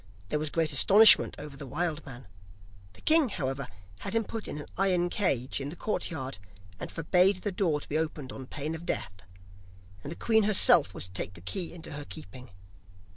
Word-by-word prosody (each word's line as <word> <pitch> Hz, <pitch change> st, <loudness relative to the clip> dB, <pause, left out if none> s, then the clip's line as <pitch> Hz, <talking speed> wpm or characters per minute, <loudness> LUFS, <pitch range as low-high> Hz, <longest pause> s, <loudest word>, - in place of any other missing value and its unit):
There 150 Hz, -, -1 dB
was 155 Hz, 0 st, -2 dB
great 160 Hz, -1 st, 0 dB
astonishment 205 Hz, +10 st, +7 dB
over 150 Hz, -2 st, -9 dB
the 140 Hz, -1 st, -9 dB
wild 155 Hz, +3 st, -3 dB
man; 125 Hz, -2 st, -10 dB, 0.7 s
the -, -, -15 dB
king, 315 Hz, -4 st, +6 dB
however, 135 Hz, -6 st, -3 dB, 0.3 s
had -, -, -5 dB
him 225 Hz, -, +2 dB
put 225 Hz, +1 st, -7 dB
in -, -, -6 dB
an 150 Hz, -, -7 dB
iron 180 Hz, -2 st, +1 dB
cage 135 Hz, -, -1 dB
in 135 Hz, -, -4 dB
his 165 Hz, -, -9 dB
courtyard, 135 Hz, -, -4 dB, 0.4 s
and -, -, -6 dB
forbade 180 Hz, +4 st, +2 dB
the 205 Hz, -, -1 dB
door 175 Hz, -6 st, 0 dB
to -, -, -11 dB
be 155 Hz, -, -1 dB
opened 150 Hz, -4 st, -4 dB
on 130 Hz, -1 st, -9 dB
pain 150 Hz, +4 st, -4 dB
of 160 Hz, +1 st, -7 dB
death, 90 Hz, -, -3 dB, 0.9 s
and 145 Hz, -, -7 dB
the -, -, -5 dB
queen 220 Hz, +3 st, +2 dB
herself 175 Hz, -, +4 dB
was -, -, -4 dB
to 90 Hz, -, -11 dB
take 95 Hz, -1 st, -4 dB
the -, -, -9 dB
key 170 Hz, -, -4 dB
into 170 Hz, -1 st, -9 dB
her 145 Hz, 0 st, -6 dB
keeping. 95 Hz, +8 st, -10 dB
155 Hz, 200 wpm, -28 LUFS, 135-180 Hz, 0.9 s, astonishment